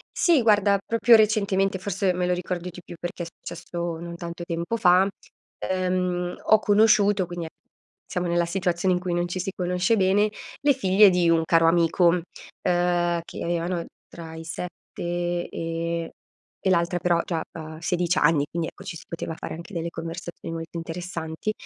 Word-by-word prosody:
Sì 335 Hz, -7 st, +4 dB
guarda, 205 Hz, -3 st, +4 dB
proprio 230 Hz, +1 st, +5 dB
recentemente, 200 Hz, -3 st, +2 dB
forse 195 Hz, 0 st, 0 dB
me 180 Hz, 0 st, -1 dB
lo 180 Hz, -, +2 dB
ricordo 180 Hz, 0 st, -3 dB
di 180 Hz, 0 st, -11 dB
più 175 Hz, -, -10 dB
perché 175 Hz, 0 st, -5 dB
è -, -, -5 dB
successo 170 Hz, 0 st, -6 dB
non 170 Hz, 0 st, -7 dB
tanto 170 Hz, 0 st, -6 dB
tempo 170 Hz, +5 st, -2 dB
fa, 185 Hz, -2 st, +5 dB, 0.5 s
ehm, 180 Hz, -1 st, -1 dB
ho 215 Hz, -, +6 dB
conosciuto, 205 Hz, -2 st, +4 dB
quindi 175 Hz, -1 st, -5 dB
e -, -, -7 dB, 0.6 s
siamo 180 Hz, 0 st, -2 dB
nella 170 Hz, 0 st, +2 dB
situazione 180 Hz, 0 st, 0 dB
in 180 Hz, -, +1 dB
cui 180 Hz, -1 st, -3 dB
non 175 Hz, 0 st, +1 dB
ci 185 Hz, -, -3 dB
si 190 Hz, +2 st, -2 dB
conosce 180 Hz, +5 st, +1 dB
bene, 200 Hz, +2 st, +3 dB, 0.3 s
le 285 Hz, 0 st, +4 dB
figlie 200 Hz, -4 st, +5 dB
di 175 Hz, -2 st, +2 dB
un 165 Hz, -1 st, +4 dB
caro 165 Hz, 0 st, +4 dB
amico, 170 Hz, +1 st, +4 dB
uhm, 170 Hz, 0 st, +3 dB, 1.0 s
che -, -, -7 dB
avevano 170 Hz, 0 st, -1 dB, 0.2 s
tra 160 Hz, -1 st, -9 dB
i 160 Hz, -, -7 dB
7 175 Hz, +1 st, -4 dB
e 165 Hz, 0 st, -3 dB, 0.5 s
e 190 Hz, -, +2 dB
l'altra 175 Hz, 0 st, +2 dB
però 170 Hz, -1 st, +2 dB
già 165 Hz, -3 st, -2 dB
ha 160 Hz, -1 st, -8 dB
16 175 Hz, 0 st, 0 dB
anni 150 Hz, -1 st, +4 dB
quindi 165 Hz, 0 st, -3 dB
ecco, -, -, -11 dB
ci -, -, -6 dB
si -, -, -9 dB
poteva 165 Hz, -1 st, -4 dB
fare -, -, -6 dB
anche 170 Hz, +5 st, -10 dB
delle 170 Hz, 0 st, -2 dB
conversazioni 165 Hz, 0 st, -7 dB
molto 165 Hz, +1 st, -6 dB
interessanti. 165 Hz, +2 st, -4 dB
175 Hz, 175 wpm, -25 LUFS, 170-190 Hz, 1.0 s, ho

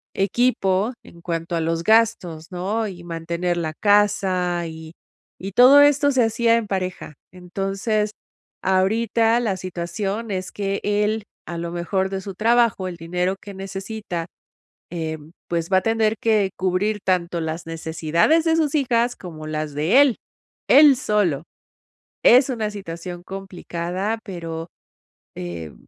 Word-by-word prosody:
equipo 200 Hz, 0 st, +1 dB
en 170 Hz, -, -16 dB
cuanto 170 Hz, 0 st, -3 dB
a 165 Hz, -, 0 dB
los 165 Hz, +1 st, -1 dB
gastos, 215 Hz, -7 st, +2 dB
¿no? 205 Hz, +5 st, -2 dB
Y 180 Hz, -3 st, -9 dB
mantener 170 Hz, +1 st, -2 dB
la 160 Hz, -2 st, -3 dB
casa 190 Hz, -3 st, +2 dB
y 160 Hz, 0 st, -9 dB, 0.5 s
y 195 Hz, +2 st, -6 dB
todo 255 Hz, +7 st, +8 dB
esto 290 Hz, 0 st, +4 dB
se 260 Hz, -2 st, +3 dB
hacía 230 Hz, +1 st, +2 dB
en 230 Hz, -, 0 dB
pareja. 185 Hz, -5 st, -4 dB, 0.2 s
Entonces, 195 Hz, +4 st, -2 dB, 0.5 s
ahorita 225 Hz, +5 st, +2 dB
la 215 Hz, -6 st, 0 dB
situación 195 Hz, +4 st, -4 dB
es 185 Hz, -1 st, -3 dB
que 200 Hz, -1 st, -2 dB
él 210 Hz, +1 st, 0 dB, 0.2 s
a 170 Hz, -, -6 dB
lo 170 Hz, 0 st, -4 dB
mejor 175 Hz, +3 st, -1 dB
de 195 Hz, 0 st, -4 dB
su 195 Hz, 0 st, -7 dB
trabajo, 225 Hz, -2 st, +2 dB
el 180 Hz, -, -5 dB
dinero 180 Hz, +3 st, -1 dB
que 205 Hz, -, -10 dB
necesita, 195 Hz, -2 st, -5 dB, 0.6 s
eh, 160 Hz, -2 st, -4 dB, 0.3 s
pues 170 Hz, -1 st, -1 dB
va 190 Hz, -, +4 dB
a 185 Hz, -, +3 dB
tener 225 Hz, -1 st, +1 dB
que 210 Hz, -4 st, +2 dB
cubrir 190 Hz, +3 st, 0 dB
tanto 175 Hz, -2 st, 0 dB
las 160 Hz, +1 st, -4 dB
necesidades 165 Hz, -, +1 dB
de 325 Hz, 0 st, +3 dB
sus 310 Hz, -3 st, +1 dB
hijas 245 Hz, -4 st, +1 dB
como 155 Hz, -4 st, -9 dB
las 155 Hz, -1 st, -3 dB
de 160 Hz, -, +3 dB
él, 275 Hz, -5 st, +4 dB, 0.5 s
él 290 Hz, -1 st, +8 dB
solo. 195 Hz, -, 0 dB, 0.8 s
Es 255 Hz, +3 st, +6 dB
una 220 Hz, -4 st, -2 dB
situación 175 Hz, -3 st, -7 dB
complicada, 190 Hz, +1 st, -4 dB
pero, 165 Hz, -4 st, -6 dB, 0.7 s
eh, 85 Hz, -3 st, -6 dB
190 Hz, 140 wpm, -22 LUFS, 170-220 Hz, 0.8 s, todo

